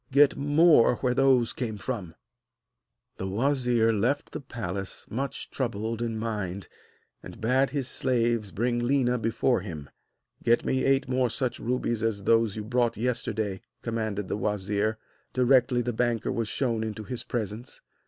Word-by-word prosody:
Get 140 +1 +5
more 145 -2 +5
where 125 -1 0
those 130 -3 +3
came 110 -5 -3
from.' 100 -6 -5 1.0
The 95 - -4
wazir 120 +1 +2
left 120 +8 0
the - - -5
palace, 100 -7 -5
much 135 +5 -4
troubled 115 -2 -2
in 115 -2 -2
mind, 105 -4 -3 0.5
and - - -11
bade 130 +4 +2
his 135 -1 -2
slaves 115 -6 0
bring 120 +2 0
Léna 125 -1 +1
before 115 0 +1
him. 80 -7 -8 0.5
'Get 120 0 +2
me 130 - +1
eight 135 0 +2
more 130 -1 +1
such 125 +2 0
rubies 120 -2 -1
as 110 -3 -1
those 115 -1 +3
you 110 - -4
brought 120 +1 0
yesterday,' 110 -4 -1 0.2
commanded 110 -4 -2
the - - -2
wazir, 105 +1 -1 0.4
directly 125 -1 +3
the 120 0 -2
banker 120 -1 0
was 115 -2 -1
shown 115 -2 0
into 110 -1 -4
his 125 +2 -4
presence. 115 +1 -4
115 Hz, 150 wpm, -27 LUFS, 110-125 Hz, 1.0 s, Get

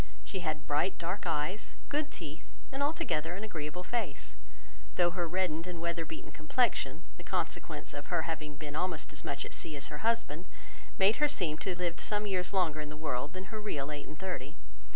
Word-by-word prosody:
She 190 - -3
had 155 -3 -1
bright 150 +6 +3
dark 180 +2 -1
eyes, 160 +6 0
good 295 +1 +1
teeth, 160 - -5 0.3
and 270 +1 -2
altogether 175 - +2
an 200 - -4
agreeable 170 -4 -3
face; 215 -9 -1 0.6
though 175 -1 +5
her 175 -1 0
reddened 175 -1 +1
and 175 -2 -3
weather 170 0 0
beaten 160 - -6
complexion, 160 - +2
the - - -8
consequence - - -1
of - - -5
her - - +2
having 155 -2 -2
been 145 0 -5
almost 160 -3 0
as 150 - -5
much 140 -1 -1
at - - -6
sea 160 -3 -3
as 140 - -3
her 150 -1 -4
husband, 205 -7 +2 0.5
made 195 +3 +7
her 295 - +6
seem 170 - +3
to - - -1
have 180 - 0
lived 175 -2 0
some 210 0 +1
years 185 -3 +2
longer 165 -6 +3
in 150 - -4
the 150 - -6
world 150 -1 -1
than 190 +3 -6
her 215 - -2
real 150 -9 -1
eight 145 -1 -4
and 155 - -8
thirty. 165 -8 -3
170 Hz, 205 wpm, -34 LUFS, 150-190 Hz, 0.6 s, made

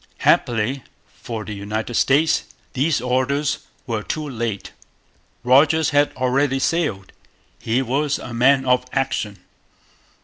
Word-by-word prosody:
Happily 120 +3 +2 0.3
for 110 -3 -7
the 110 - -6
United 105 +4 -4
States, 145 +7 +2 0.3
these 140 0 +1
orders 130 +3 0 0.3
were 115 -3 -2
too 155 +6 -4
late. 115 -6 -4 0.7
Rodgers 145 +5 +4
had 145 0 +3
already 130 +2 +1
sailed. 135 - -1 0.5
He 120 +4 0
was 140 +3 0
a 125 - -8
man 130 +3 +3
of 125 0 +3
action. 130 -7 -1
130 Hz, 115 wpm, -21 LUFS, 115-140 Hz, 0.7 s, Rodgers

